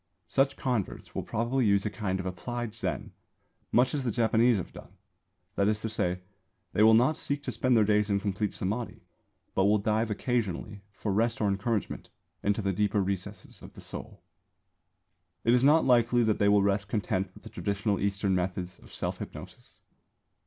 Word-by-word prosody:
Such 135 Hz, 0 st, +1 dB
converts 125 Hz, -7 st, -2 dB
will -, -, -2 dB
probably 120 Hz, +4 st, 0 dB
use 100 Hz, 0 st, +3 dB
a 105 Hz, -, -1 dB
kind 95 Hz, -2 st, -2 dB
of 95 Hz, -, -4 dB
applied 115 Hz, +5 st, -4 dB
Zen, 95 Hz, -, -4 dB, 0.6 s
much 125 Hz, +2 st, +3 dB
as 145 Hz, -2 st, -1 dB
the 125 Hz, -, 0 dB
Japanese 115 Hz, +1 st, +3 dB
have 95 Hz, -, -6 dB
done; -, -, -12 dB, 0.6 s
that 100 Hz, -, +1 dB
is 105 Hz, 0 st, +1 dB
to 110 Hz, -, -2 dB
say, 90 Hz, -3 st, -1 dB, 0.5 s
they 105 Hz, -, +2 dB
will 110 Hz, +1 st, +7 dB
not 125 Hz, +7 st, +4 dB
seek 145 Hz, 0 st, -3 dB
to 130 Hz, -, -3 dB
spend 120 Hz, +2 st, +2 dB
their 110 Hz, -, +5 dB
days 105 Hz, 0 st, +2 dB
in 100 Hz, -1 st, +2 dB
complete 100 Hz, +1 st, -1 dB
Samādhi, 110 Hz, +5 st, -3 dB, 0.5 s
but 95 Hz, -, +2 dB
will 105 Hz, +1 st, +4 dB
dive 110 Hz, +2 st, 0 dB
occasionally, 105 Hz, -3 st, -2 dB
for 100 Hz, 0 st, -3 dB
rest 115 Hz, +4 st, +1 dB
or 105 Hz, -, +1 dB
encouragement, 100 Hz, +2 st, -2 dB, 0.3 s
into 105 Hz, +1 st, 0 dB
the 100 Hz, 0 st, 0 dB
deeper 105 Hz, +1 st, +1 dB
recesses 100 Hz, 0 st, -5 dB
of -, -, -12 dB
the -, -, -12 dB
soul. -, -, -8 dB, 1.2 s
It 115 Hz, -, +4 dB
is 125 Hz, 0 st, +4 dB
not 150 Hz, +4 st, +5 dB
likely 120 Hz, -1 st, +4 dB
that 110 Hz, -2 st, +1 dB
they 100 Hz, -, +4 dB
will 100 Hz, -1 st, +5 dB
rest 100 Hz, 0 st, +1 dB
content 100 Hz, -2 st, -1 dB
with -, -, -15 dB
the -, -, -9 dB
traditional 100 Hz, 0 st, -1 dB
Eastern 100 Hz, -1 st, 0 dB
methods 90 Hz, 0 st, -2 dB
of -, -, -16 dB
self -, -, -3 dB
hypnosis. -, -, -10 dB
105 Hz, 185 wpm, -29 LUFS, 100-115 Hz, 1.2 s, will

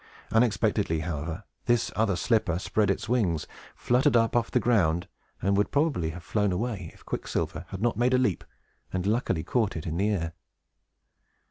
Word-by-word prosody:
Unexpectedly, 110 Hz, -8 st, +2 dB
however, 80 Hz, +3 st, -4 dB, 0.2 s
this 120 Hz, -2 st, +2 dB
other 105 Hz, -2 st, +2 dB
slipper 100 Hz, -5 st, +1 dB
spread 105 Hz, +2 st, +1 dB
its 100 Hz, -, -1 dB
wings, 95 Hz, -11 st, +1 dB, 0.3 s
fluttered 125 Hz, +1 st, +3 dB
up 115 Hz, 0 st, +2 dB
off 120 Hz, -1 st, +2 dB
the -, -, +2 dB
ground, 90 Hz, -6 st, +2 dB, 0.4 s
and 100 Hz, +2 st, +3 dB
would 105 Hz, +1 st, +2 dB
probably 145 Hz, -, +1 dB
have 85 Hz, +1 st, -8 dB
flown 105 Hz, +3 st, +1 dB
away, 100 Hz, -3 st, -2 dB
if -, -, -20 dB
Quicksilver 75 Hz, +4 st, -3 dB
had 95 Hz, +2 st, -6 dB
not 120 Hz, -, +1 dB
made 125 Hz, +2 st, +3 dB
a -, -, +5 dB
leap, 115 Hz, -8 st, +1 dB, 0.5 s
and 95 Hz, -1 st, -2 dB
luckily 100 Hz, -6 st, 0 dB
caught 110 Hz, +2 st, 0 dB
it 80 Hz, -, -5 dB
in 80 Hz, 0 st, -2 dB
the 100 Hz, +3 st, +2 dB
air. 85 Hz, -5 st, -1 dB
100 Hz, 170 wpm, -27 LUFS, 85-115 Hz, 0.5 s, a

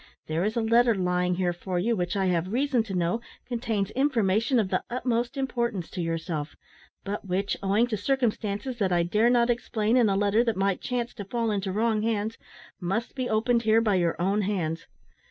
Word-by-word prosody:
There 160 Hz, +2 st, -1 dB
is 215 Hz, +3 st, -1 dB
a 230 Hz, -, +1 dB
letter 230 Hz, +1 st, +4 dB
lying 180 Hz, -1 st, +1 dB
here 180 Hz, -1 st, 0 dB
for 180 Hz, +1 st, -4 dB
you, 225 Hz, +6 st, +1 dB
which, 180 Hz, -1 st, -2 dB
I 195 Hz, -1 st, +1 dB
have 180 Hz, 0 st, 0 dB
reason 260 Hz, +1 st, +2 dB
to 195 Hz, -3 st, -5 dB
know, 175 Hz, +6 st, 0 dB, 0.2 s
contains 225 Hz, -5 st, -2 dB
information 235 Hz, -3 st, +2 dB
of 210 Hz, -5 st, +1 dB
the -, -, 0 dB
utmost 245 Hz, +1 st, -1 dB
importance 235 Hz, -8 st, -2 dB
to 185 Hz, -, -4 dB
yourself; 165 Hz, -2 st, -3 dB, 0.5 s
but 200 Hz, 0 st, -5 dB
which 190 Hz, +2 st, 0 dB
owing 200 Hz, +4 st, +3 dB
to 230 Hz, -3 st, -3 dB
circumstances 235 Hz, 0 st, -1 dB
that 195 Hz, -3 st, +1 dB
I 175 Hz, -1 st, +3 dB
dare 210 Hz, +7 st, +2 dB
not 240 Hz, 0 st, +4 dB
explain 225 Hz, -1 st, 0 dB
in 235 Hz, -4 st, +4 dB
a 195 Hz, -, +1 dB
letter 205 Hz, +3 st, +3 dB
that 230 Hz, -5 st, -1 dB
might 195 Hz, -1 st, 0 dB
chance 245 Hz, -1 st, -2 dB
to 205 Hz, -, -7 dB
fall 230 Hz, +2 st, -1 dB
into 195 Hz, -2 st, -1 dB
wrong 220 Hz, +1 st, +1 dB
hands 220 Hz, 0 st, -1 dB, 0.4 s
must 195 Hz, +6 st, -2 dB
be 255 Hz, -2 st, -3 dB
opened 230 Hz, +2 st, +2 dB
here 220 Hz, 0 st, +4 dB
by 220 Hz, -3 st, +2 dB
your 175 Hz, -3 st, +1 dB
own 195 Hz, +4 st, +1 dB
hands. 170 Hz, -5 st, -2 dB
210 Hz, 200 wpm, -27 LUFS, 185-235 Hz, 0.5 s, letter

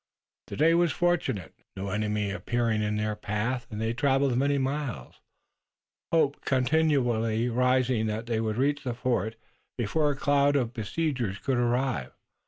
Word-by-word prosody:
The -, -, -6 dB
day 160 Hz, +3 st, +4 dB
was 170 Hz, -1 st, +3 dB
fortunate, 175 Hz, -, 0 dB, 0.2 s
no 100 Hz, +1 st, -4 dB
enemy 105 Hz, 0 st, -1 dB
appearing 115 Hz, +1 st, 0 dB
in 105 Hz, 0 st, -1 dB
their 105 Hz, 0 st, -1 dB
path, 110 Hz, +4 st, -2 dB
and 105 Hz, -, -6 dB
they 110 Hz, +1 st, 0 dB
traveled 135 Hz, 0 st, +2 dB
many 140 Hz, +3 st, +2 dB
miles, 135 Hz, -, -3 dB, 0.9 s
hope 145 Hz, -4 st, +2 dB
continually 125 Hz, -5 st, +1 dB
rising 125 Hz, -1 st, +2 dB
that 110 Hz, +1 st, -3 dB
they 115 Hz, -2 st, -1 dB
would 110 Hz, -1 st, -2 dB
reach 140 Hz, +2 st, +1 dB
the 125 Hz, -3 st, -3 dB
fort 115 Hz, -3 st, -1 dB, 0.4 s
before 145 Hz, +6 st, +1 dB
a 145 Hz, -, -1 dB
cloud 145 Hz, +1 st, +2 dB
of 125 Hz, -4 st, 0 dB
besiegers 120 Hz, -2 st, -2 dB
could 125 Hz, +6 st, -1 dB
arrive. 120 Hz, -, 0 dB
120 Hz, 150 wpm, -27 LUFS, 110-140 Hz, 0.9 s, day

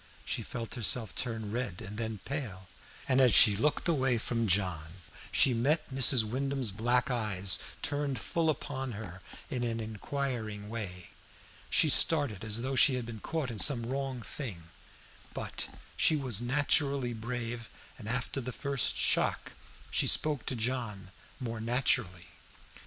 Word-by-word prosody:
She -, -, -1 dB
felt 115 Hz, -2 st, -6 dB
herself 115 Hz, -5 st, 0 dB
turn 110 Hz, -4 st, -3 dB
red 115 Hz, -6 st, -3 dB
and 100 Hz, +3 st, -7 dB
then 110 Hz, -2 st, -4 dB
pale, 115 Hz, -10 st, -5 dB, 0.4 s
and 130 Hz, +1 st, +4 dB
as 125 Hz, -5 st, +6 dB
she 105 Hz, -, +8 dB
looked 150 Hz, -, +1 dB
away 135 Hz, -7 st, +2 dB
from 115 Hz, 0 st, -1 dB
John 90 Hz, -4 st, 0 dB, 0.4 s
she 130 Hz, -, +6 dB
met 145 Hz, +5 st, +1 dB
Mrs. 130 Hz, -2 st, +4 dB
Wyndham's 130 Hz, +1 st, -2 dB
black 120 Hz, +6 st, +1 dB
eyes 100 Hz, -7 st, +2 dB, 0.2 s
turned 145 Hz, -2 st, -1 dB
full 165 Hz, -1 st, 0 dB
upon 135 Hz, -4 st, -3 dB
her 95 Hz, -3 st, -8 dB, 0.3 s
in 125 Hz, -2 st, -1 dB
an 115 Hz, -1 st, -1 dB
inquiring 110 Hz, -1 st, -4 dB
way. 95 Hz, -6 st, -6 dB, 0.6 s
She -, -, +4 dB
started 145 Hz, -, +3 dB
as 110 Hz, +2 st, -1 dB
though 135 Hz, +1 st, -2 dB
she 130 Hz, 0 st, +6 dB
had 125 Hz, -2 st, -3 dB
been 115 Hz, -2 st, -7 dB
caught 150 Hz, +1 st, -3 dB
in 110 Hz, -, -5 dB
some 125 Hz, -5 st, +3 dB
wrong 130 Hz, -1 st, -3 dB
thing; 110 Hz, -, -6 dB, 0.7 s
but -, -, -3 dB, 0.3 s
she 160 Hz, -, +4 dB
was 130 Hz, -7 st, +1 dB
naturally 140 Hz, 0 st, +1 dB
brave, 115 Hz, 0 st, -5 dB, 0.3 s
and 110 Hz, -, -6 dB
after 125 Hz, +3 st, -2 dB
the 125 Hz, +1 st, -5 dB
first 140 Hz, -1 st, 0 dB
shock -, -, +1 dB, 0.4 s
she -, -, +2 dB
spoke 150 Hz, -5 st, +2 dB
to 130 Hz, -, 0 dB
John 110 Hz, -5 st, -3 dB, 0.3 s
more 115 Hz, -3 st, -4 dB
naturally. 115 Hz, -7 st, 0 dB
120 Hz, 150 wpm, -31 LUFS, 110-135 Hz, 0.7 s, she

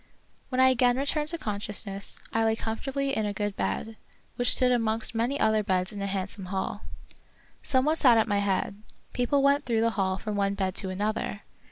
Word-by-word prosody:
When 255 Hz, -, -2 dB
I 260 Hz, 0 st, +7 dB
again 250 Hz, -1 st, +3 dB
returned 295 Hz, +2 st, -1 dB
to 335 Hz, -, -2 dB
consciousness, 205 Hz, -4 st, -2 dB
I 225 Hz, -, +2 dB
lay 220 Hz, 0 st, +2 dB
comfortably 270 Hz, +5 st, -3 dB
in 215 Hz, -1 st, 0 dB
a 205 Hz, -, -3 dB
good 205 Hz, 0 st, -3 dB
bed, 220 Hz, 0 st, -3 dB, 0.4 s
which 245 Hz, -, +5 dB
stood 255 Hz, -1 st, +3 dB
amongst 225 Hz, -2 st, +2 dB
many 240 Hz, +5 st, -1 dB
other 220 Hz, 0 st, +3 dB
beds 185 Hz, -2 st, -1 dB
in 200 Hz, -, -6 dB
a 200 Hz, -, -2 dB
handsome 195 Hz, 0 st, -4 dB
hall. 190 Hz, +2 st, -3 dB, 0.8 s
Some 260 Hz, -1 st, +2 dB
one 310 Hz, +1 st, +2 dB
sat 245 Hz, -6 st, +5 dB
at 220 Hz, -, +2 dB
my 205 Hz, -1 st, +1 dB
head; 200 Hz, 0 st, -1 dB, 0.3 s
people 260 Hz, +3 st, +1 dB
went 280 Hz, +1 st, +3 dB
through 230 Hz, -2 st, +1 dB
the 230 Hz, 0 st, +2 dB
hall 190 Hz, -3 st, -1 dB
from 210 Hz, +1 st, -4 dB
one 200 Hz, 0 st, 0 dB
bed 190 Hz, -2 st, -1 dB
to 190 Hz, -, 0 dB
another. 205 Hz, +1 st, -3 dB
220 Hz, 200 wpm, -27 LUFS, 200-250 Hz, 0.8 s, I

